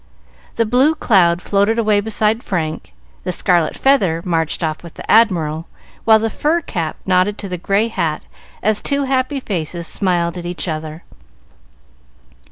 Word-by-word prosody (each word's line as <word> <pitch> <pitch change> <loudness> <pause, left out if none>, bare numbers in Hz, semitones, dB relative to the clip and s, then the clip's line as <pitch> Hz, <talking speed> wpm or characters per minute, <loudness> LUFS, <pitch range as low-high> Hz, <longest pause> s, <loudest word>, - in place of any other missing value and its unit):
The 230 - +1
blue 260 +8 +3
cloud 180 - +3
floated 205 +3 +1
away 215 -3 +2
beside 220 +1 0
Frank, 160 - -3 0.3
the - - -2
scarlet 175 -3 +1
feather 190 -12 +2
marched 165 -1 -1
off 155 -1 -2
with 170 -2 -12
the - - -9
Admiral, 165 -8 +3 0.4
while 220 -1 +7
the 220 +1 -1
fur 315 +3 +1
cap 170 - -4
nodded 185 +2 +2
to 200 - -5
the 180 -2 -5
gray 200 +5 +1
hat 160 -9 -2 0.4
as 215 0 +2
two 280 0 0
happy 265 +1 0
faces 170 - -4
smiled 175 -1 0
at 175 - -8
each 175 +1 -3
other. 155 0 -5
190 Hz, 155 wpm, -18 LUFS, 170-225 Hz, 0.4 s, while